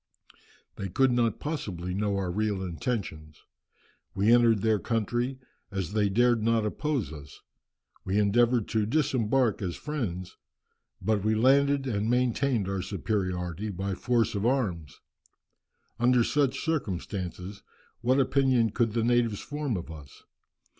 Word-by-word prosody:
They 95 - -4
could 130 +8 +3
not 120 -2 +1
possibly 95 - -4
know 100 +1 0
our 95 -2 -2
real 105 0 -1
intentions. 85 - -4 0.7
We 105 +4 +4
entered 115 -4 +4
their 110 -2 +3
country, 120 +4 -1 0.3
as 95 -2 -4
they 105 -2 +2
dared 120 +2 +3
not 115 0 +2
oppose 120 - -2
us; 70 -2 -11 0.6
we 95 +2 -1
endeavoured 115 +2 +3
to 110 -2 0
disembark 130 -4 +1
as 90 -3 -3
friends, 100 - -5 0.7
but 110 -3 +1
we 110 +1 +2
landed 140 +4 +3
and 110 -3 -1
maintained 125 -2 +1
our 95 -1 -2
superiority 95 -1 -3
by 95 0 -3
force 115 +4 +1
of 100 -1 -2
arms. 105 - -1 1.0
Under 120 0 +4
such 140 +1 +1
circumstances 95 - -3 0.4
what 130 +3 +2
opinion 130 -4 +2
could 115 -1 0
the 115 -1 0
natives 120 -3 +1
form 145 -7 -3
of 85 -1 -7
us? 75 -4 -12
110 Hz, 135 wpm, -28 LUFS, 95-125 Hz, 1.0 s, We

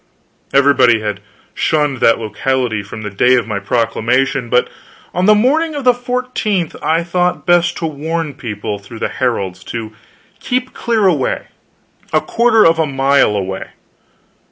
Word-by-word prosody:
Everybody 130 -5 +4
had 105 -2 -3 0.3
shunned 150 -3 0
that 115 - +4
locality 115 +1 -1
from 105 +2 -9
the 105 - -5
day 125 +6 +3
of 120 - +1
my 105 -3 -2
proclamation, 120 +4 0
but 125 +1 +2 0.5
on 180 +2 +1
the 215 - +7
morning 300 +8 +2
of 285 - -4
the 250 -1 +5
fourteenth 245 -7 -2
I 165 +2 +1
thought 180 +1 -1
best 175 -1 +2
to 165 - -3
warn 160 +1 -3
the - - -10
people, 105 -5 -5
through 100 +3 -11
the - - -2
heralds, 100 -7 -2
to 110 -2 -6 0.5
keep 255 +1 -2
clear 225 -3 0
away 155 -8 0 0.6
a 155 - +3
quarter 230 +4 +3
of 165 0 +4
a 160 - +2
mile 135 -4 +2
away. 95 -1 -4
140 Hz, 155 wpm, -16 LUFS, 115-180 Hz, 0.6 s, the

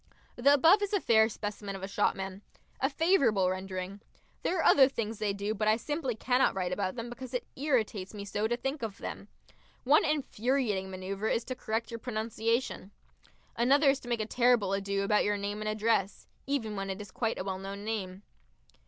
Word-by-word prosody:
The 265 +4 +4
above 330 +9 +6
is 410 0 -2
a 405 - +3
fair 220 -7 +4
specimen 205 -2 -5
of 190 - -8
a - - -2
shopman 195 -1 -1 0.4
a 270 - +2
favourable 270 - +3
rendering. 185 +1 -5 0.4
There 370 - 0
are 325 - +1
other 270 -1 +7
things 225 -4 -4
they 210 -2 0
do, 200 +2 -2
but 215 0 -1
I 215 +1 +4
simply 275 0 -2
cannot 250 +2 +2
write 180 -2 -1
about 185 +1 -2
them 235 -1 -5
because 255 +1 -7
it 250 - -2
irritates 225 -9 0
me 205 -2 -7
so 205 +2 -1
to 240 +1 -1
think 270 +4 -3
of 220 -4 -4
them. - - -7 0.6
One 285 +4 +5
infuriating 255 -8 0
manoeuvre 195 +3 -3
is 230 - +1
to 255 - -5
correct 225 -1 -3
your 230 - -5
pronunciation. 225 -2 -2 0.7
Another 275 +4 +4
is 275 - -2
to 245 - -10
make 235 -2 0
a - - -1
terrible 235 -4 +3
ado 200 0 -1
about 210 +1 +3
your 205 0 +1
name 205 +1 -4
and 215 - -2
address 215 -2 0 0.2
even 235 -7 -1
when 195 0 -4
it 190 +1 -4
is 205 -2 -9
quite 225 +1 -1
a - - -3
well 190 -1 -3
known 200 +1 -7
name. 200 -3 -4
220 Hz, 200 wpm, -30 LUFS, 200-250 Hz, 0.7 s, other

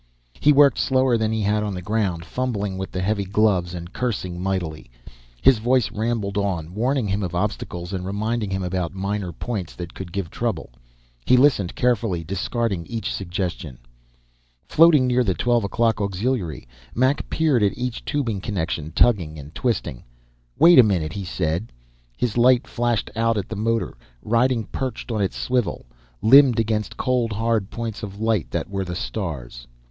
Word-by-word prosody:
He 150 - +5
worked 140 -3 +5
slower 130 -2 +2
than 110 -1 0
he 110 -1 -1
had 105 +1 +1
on 105 -2 -3
the 90 - -5
ground, 95 -5 -1
fumbling 105 -7 -2
with 95 - -5
the 95 - -3
heavy 100 +1 0
gloves 95 -3 +1
and 85 0 -8
cursing 95 -8 -3
mightily. 90 -7 -3 0.5
His 130 -5 +6
voice 120 0 +2
rambled 105 -2 -1
on, 90 -5 -2
warning 125 +2 0
him 100 +1 -1
of 90 -3 -3
obstacles 90 -2 -3
and 95 -1 -3
reminding 105 +3 -2
him 95 -1 -2
about 90 -1 -2
minor 100 -1 -2
points 95 0 -5
that 85 -1 -7
could 95 -2 -8
give 95 -3 -4
trouble. - - -3 0.6
He 125 - +6
listened 125 -9 +3
carefully, 115 -8 0
discarding 95 0 -2
each 115 -3 -3
suggestion. 90 -7 -4 0.9
Floating 155 -4 +6
near 125 0 +2
the 95 -6 0
twelve 120 -2 +1
o'clock 115 +2 +1
auxiliary, 100 - -2 0.3
Mac 130 +4 +1
peered 155 -7 +2
at 100 -1 +1
each 125 -1 -4
tubing 115 -9 -2
connection, 85 -6 -3
tugging 85 -8 +2
and 75 +2 -10
twisting. 115 - -2 0.5
"Wait 170 -2 +8
a - - +10
minute," 85 -7 0
he 100 - -4
said. 85 +4 -2 0.5
His 120 -1 -1
light 125 +1 +5
flashed 120 -2 -1
out 115 0 +1
at 100 - -3
the 110 - -4
motor, 115 +2 -1 0.3
riding 115 +1 +2
perched 130 +1 -5
on 110 -2 -1
its 95 - -1
swivel, 125 - -1 0.4
limned 130 0 +7
against 110 -1 -1
cold, 125 -3 0
hard 110 -2 0
points 115 -3 -5
of 100 -2 -7
light 110 -4 0
that - - -3
were 95 -1 -3
the 90 -1 -5
stars. 65 - -5
105 Hz, 170 wpm, -23 LUFS, 90-120 Hz, 0.9 s, a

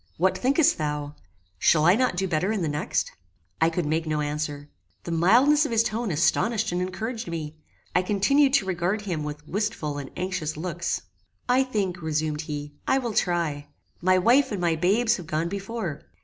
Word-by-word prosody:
What 185 +3 +2
thinkest 275 - +2
thou? 150 -1 -3 0.5
Shall 155 - +4
I 175 - +7
not 255 -4 +1
do 190 +2 0
better 180 +4 0
in 210 -5 -1
the - - 0
next?" 150 0 -1 0.5
I 160 - +5
could 170 0 -2
make 160 +2 -1
no 155 -1 0
answer. 145 -1 -3 0.4
The 170 - -5
mildness 240 - +5
of 295 - -2
his 230 -1 +3
tone 230 0 -2
astonished 210 +7 +1
and 175 +1 -1
encouraged 220 +5 -4
me. 155 -2 -5 0.4
I 180 - +5
continued 260 +9 +3
to 240 - +2
regard 185 +3 -1
him 180 -7 -3
with 150 0 -7
wistful 180 -7 -2
and 135 -2 -7
anxious 180 -5 -3
looks. 170 - -3 0.4
"I 255 +2 +4
think," 195 -8 -2
resumed 155 -1 -1
he, 145 0 -5
"I 265 - +3
will 240 -4 -2
try. 165 -7 0 0.3
My 185 +1 +4
wife 250 +8 +4
and 205 - -2
my 170 -2 +1
babes 205 +8 +2
have 175 -5 -9
gone 160 +2 -1
before. 195 -4 -4
180 Hz, 185 wpm, -25 LUFS, 155-220 Hz, 0.5 s, I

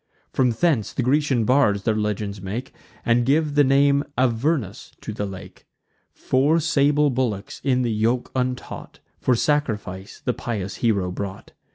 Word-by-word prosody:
From 130 -2 +3
hence 115 - +1
the 130 - -1
Grecian 130 -3 +2
bards 120 -6 +3
their 110 -2 +1
legends 105 -2 -2
make, 110 +8 -5 0.3
And 120 +1 +3
give 145 +4 +2
the 145 0 +5
name 140 +1 +4
Avernus 125 - 0
to 110 - -6
the 105 -1 -3
lake. 95 -1 -11 0.4
Four 145 +6 +2
sable 150 -2 +2
bullocks, 120 -6 -2
in 130 -2 +2
the 120 - 0
yoke 115 +3 0
untaught, 125 -1 -4 0.2
For 130 - +2
sacrifice 110 -9 -2
the 125 - +1
pious 105 -5 -4
hero 100 -6 +1
brought. 95 +1 -6
125 Hz, 150 wpm, -23 LUFS, 105-140 Hz, 0.4 s, the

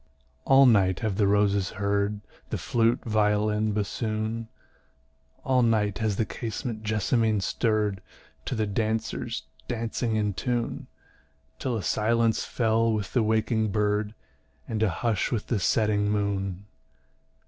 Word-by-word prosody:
All 135 0 +7
night 100 -6 +4
have 110 -4 -1
the 105 -2 +3
roses 100 -1 +2
heard 100 +1 0 0.3
The - - -2
flute, 115 0 +1
violin, 105 0 +1
bassoon; 110 +2 -2 1.0
All 130 -1 +3
night 110 -4 +1
has 110 -3 0
the 110 - 0
casement 115 0 -5
jessamine 110 +1 +1
stirr'd 105 -1 0 0.4
To - - -2
the 110 -1 0
dancers 110 +2 -2 0.2
dancing 115 -1 -2
in 105 -1 0
tune: 120 +2 -2 0.7
Till 125 -3 -1
a 105 - -4
silence 115 +3 +1
fell 115 -1 +1
with 105 -3 -3
the 125 - +3
waking 110 0 +1
bird, 105 +1 0 0.5
And 110 -1 -3
a 110 - +3
hush 110 +3 -1
with 115 -4 -1
the 115 - -1
setting 105 +1 +2
moon. 100 -2 -2
110 Hz, 130 wpm, -26 LUFS, 105-115 Hz, 1.0 s, All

